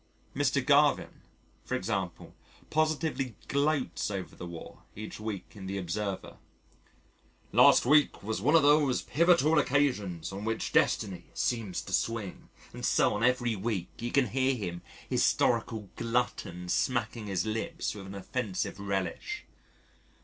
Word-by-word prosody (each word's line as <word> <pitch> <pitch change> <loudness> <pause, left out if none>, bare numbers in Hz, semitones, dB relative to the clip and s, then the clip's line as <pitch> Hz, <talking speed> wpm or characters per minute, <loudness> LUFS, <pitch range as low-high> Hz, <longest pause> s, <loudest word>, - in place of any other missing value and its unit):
Mr. - - +1
Garvin, - - +3 0.4
for - - -2
example, - - -3 0.4
positively 155 -6 0
gloats 140 -3 0
over 95 -2 -5
the 90 - -7
War 85 -1 -9 0.2
each 105 +1 -7
week 105 -3 -5
in 100 -3 -8
the 100 +1 -3
Observer: 95 +2 -4 1.1
"Last - - +6
week 145 -2 +4
was 110 -1 -2
one 150 +8 +4
of 165 - +6
those 145 -3 +4
pivotal 165 -1 +4
occasions 105 - 0
on 100 +1 -6
which 110 0 -2
destiny 95 -5 +1
seems 110 -7 -1
to - - -8
swing" 115 -5 -2 0.2
and - - -8
so - - +3
on 105 +2 -2
every 120 -2 +2
week, 100 -3 -2
you 120 +1 -3
can 135 -5 +3
hear 130 +3 +1
him, 90 -6 -5 0.3
historical 110 -3 +1
glutton 115 -7 -2
smacking 115 +2 -1
his 95 -3 -1
lips 110 +1 -2
with 100 -2 -9
an 95 - -8
offensive 100 -1 -3
relish. 95 -3 -3
110 Hz, 135 wpm, -30 LUFS, 95-130 Hz, 1.1 s, Last